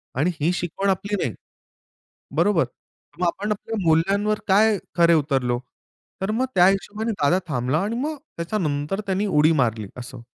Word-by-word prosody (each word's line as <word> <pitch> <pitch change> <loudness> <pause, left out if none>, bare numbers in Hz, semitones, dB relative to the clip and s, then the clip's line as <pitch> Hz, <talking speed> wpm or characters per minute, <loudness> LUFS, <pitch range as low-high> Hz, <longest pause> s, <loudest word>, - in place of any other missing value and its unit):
आणि 150 +8 +1
ही 165 +4 +3
शिकवण 180 +3 -2
आपली 200 +2 0
नाही. 115 - -2 1.0
बरोबर? 170 +1 +3 0.5
मग 180 - +1
आपण 205 +5 -2
आपल्या 220 +2 -3
मूल्यांवर 200 +6 +2
काय 210 +2 +4 0.2
खरे 170 0 +6
उतरलो? 135 -6 +1 0.6
तर 190 +2 0
मग 240 +4 +1
त्या 180 0 +7
हिशोबाने 210 +3 0
दादा 175 -1 +2
थांबला 130 +2 0
आणि 220 +3 -2
मग 310 +1 -2 0.2
त्याच्यानंतर 170 -2 -2
त्यानी 195 +2 0
उडी 155 -3 +4
मारली. 110 -4 0
असं. 125 0 -8
180 Hz, 150 wpm, -23 LUFS, 145-205 Hz, 1.0 s, त्या